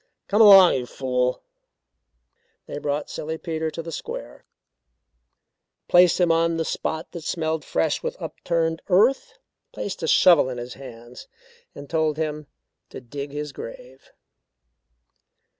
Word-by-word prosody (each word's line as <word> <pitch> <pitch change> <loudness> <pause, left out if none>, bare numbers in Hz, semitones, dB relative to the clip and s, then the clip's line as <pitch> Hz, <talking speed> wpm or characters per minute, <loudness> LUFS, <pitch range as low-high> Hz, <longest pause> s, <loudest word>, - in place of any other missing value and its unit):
"Come 210 +3 +3
along, 195 -4 +9
you 125 -2 -2
fool!" 125 -1 -2 1.2
They 145 - -6
brought 145 0 -2
Silly 160 +1 -5
Peter 160 -1 -3
to 165 +1 -7
the 165 - -7
square, - - -8 1.4
placed 180 0 +5
him 175 -2 +3
on 165 0 +1
the 160 - -1
spot 160 +1 -4
that 170 - -7
smelled 160 -1 -2
fresh - - -1
with 485 +1 -5
upturned 165 -1 -2
earth, 265 - +2 0.3
placed 195 -2 -6
a 160 - -2
shovel 165 -5 +5
in 125 - -5
his 120 0 -7
hands 120 -2 -12 0.5
and 145 0 -10
told 155 -1 0
him 150 -2 -4 0.4
to - - -9
dig 140 +3 -7
his 150 0 -5
grave. - - -11
160 Hz, 135 wpm, -23 LUFS, 145-180 Hz, 1.4 s, along